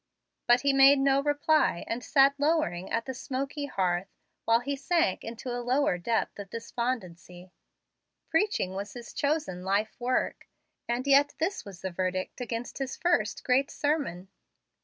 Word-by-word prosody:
But 240 +1 +5
he 280 +1 +2
made 275 +1 +7
no 275 0 +3
reply, 290 - +2
and 235 +1 -4
sat 275 +1 +5
lowering 290 - 0
at 230 0 -1
the 260 - -4
smoky 275 +3 -4
hearth 180 -4 0 0.4
while 230 +1 +4
he 280 +3 -2
sank 280 - 0
into 235 +2 -6
a 245 - -3
lower 245 -6 +1
depth 225 +3 -1
of 200 -1 -7
despondency. 190 -7 -5 0.8
Preaching 325 - 0
was 200 +2 -5
his 240 -1 -9
chosen 285 - -1
life 200 +3 0
work, 250 +1 -1 0.4
and 240 +2 -1
yet 280 +1 +4
this 355 +5 -2
was 195 -4 -11
the 190 - -3
verdict 185 +5 -3
against 240 +1 -5
his 270 -1 -4
first 350 -1 0
great 265 +2 +2
sermon. 280 - -2
245 Hz, 155 wpm, -28 LUFS, 195-280 Hz, 0.8 s, made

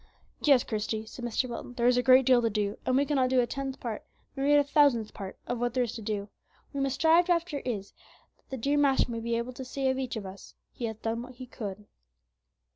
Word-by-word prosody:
"Yes, 275 -5 +5
Christie," 220 0 -3
said 240 +2 -10
Mr. 240 +2 -1
Wilton, 245 0 -7
"there 235 - 0
is 245 0 +5
a 250 - +3
great 255 0 +6
deal 250 -1 +5
to 230 - +1
do, 205 -1 -1
and 255 - +3
we 280 - +3
cannot 270 -3 +1
do 260 0 +3
a 245 - +3
tenth 270 +2 -5
part, 230 -4 -5 0.3
nor 270 0 -1
yet 290 0 +6
a 290 - +5
thousandth 280 -7 +3
part, 195 -2 -7
of 245 - -3
what 245 0 -1
there 255 - +3
is 235 - -4
to 230 - -7
do; 210 -1 -2
what 205 +7 -20
we 280 - -3
must 275 -1 0
strive 330 +4 +4
after 335 -4 +1
is, 210 -7 -4 0.4
that - - -38
the 265 - -4
dear 280 +5 +1
Master 270 -3 +3
may 230 - -3
be 230 0 -1
able 235 +2 -4
to 260 - -7
say 265 +1 -1
of 260 - -3
each 260 -1 -3
of 215 -3 -5
us, 190 +1 -11 0.2
'He 240 - -5
hath 220 -1 -6
done 230 +1 -1
what 255 +1 -10
he 255 +1 -8
could.'" 210 -4 -7
245 Hz, 260 wpm, -29 LUFS, 225-270 Hz, 0.4 s, great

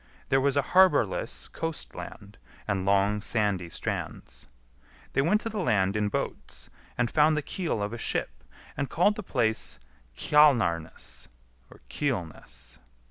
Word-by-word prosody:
There 135 0 +3
was 140 +1 +2
a 140 - +3
harbourless 180 - +3
coast 165 -1 -5
land, 105 -1 -10 0.3
and 100 -2 -1
long 100 +1 +3
sandy 100 -6 0
strands. - - -5 0.7
They 135 - +3
went 200 +9 +2
to 225 - -3
the 215 -1 -4
land 105 - +2
in 105 -1 +1
boats, - - -5 0.3
and 120 -1 +1
found 155 0 +4
the 150 - -1
keel 165 - -2
of 105 +2 -3
a 120 - -5
ship, - - -2 0.3
and 140 -2 -2
called 180 +8 +3
the 210 - -5
place 110 - 0 0.4
Kjalar 130 - +4
nes 80 - -10 0.6
(Keelness). 115 - -4
120 Hz, 140 wpm, -28 LUFS, 100-150 Hz, 0.7 s, found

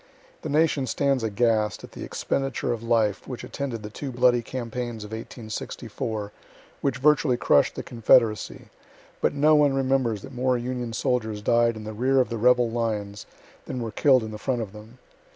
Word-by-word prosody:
The - - -5
nation 150 -3 +2
stands 135 +2 +1
aghast 110 -1 +1
at - - -10
the - - -8
expenditure 135 -3 -2
of 115 - -5
life 115 -3 +1
which 125 - -6
attended 130 -6 -5
the 105 - -7
two 135 +5 -6
bloody 125 0 +3
campaigns 120 -2 -5
of 105 - -9
1864, 110 -1 -5 0.5
which 135 -3 0
virtually 135 -1 +3
crush'd 70 - +3
the - - -5
confederacy, 115 -1 +2 0.5
but - - +1
no 150 +2 +4
one 145 -2 +4
remembers 130 -6 0
that 135 - -10
more 125 0 +1
Union 120 -1 -4
soldiers 110 -3 -1
died 115 +1 +3
in 110 - -8
the 110 0 -6
rear 130 +5 +2
of 130 - +2
the 115 -2 -3
rebel 120 0 +4
lines 105 -3 -3 0.4
than 130 - -4
were 115 -2 -4
kill'd 130 +2 +4
in 110 - -6
the 105 - -7
front 125 -2 -1
of 100 -2 -10
them. 110 +3 -13
120 Hz, 180 wpm, -25 LUFS, 110-130 Hz, 0.5 s, no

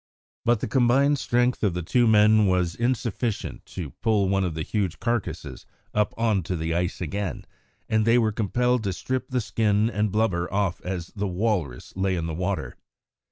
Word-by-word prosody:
But 120 -2 +3
the - - -1
combined 135 +4 +3
strength 125 0 +1
of 100 -5 +1
the 90 - -2
two 120 +7 +3
men 110 -1 +5
was 90 -2 +1
insufficient 120 -1 -2
to 85 -7 -6
pull 105 -4 +2
one 95 0 +2
of 85 -4 -2
the 80 - -2
huge 95 -3 -2
carcases 120 -3 -3 0.3
up 105 -1 +1
on 110 -4 +2
to 90 - 0
the 80 +1 -2
ice 90 +2 -1
again, 100 +3 -3 0.4
and 110 0 +2
they 115 +2 +4
were 110 -3 +2
compelled 120 +3 +1
to 95 - 0
strip 130 +7 -3
the 125 - 0
skin 110 -1 +1
and 105 -2 0
blubber 95 -5 0
off 95 -2 0
as 90 -2 -4
the 100 0 -1
walrus 90 - -2
lay 95 0 0
in 85 -2 -2
the 80 - -3
water. 90 -7 -3
105 Hz, 185 wpm, -25 LUFS, 90-115 Hz, 0.4 s, men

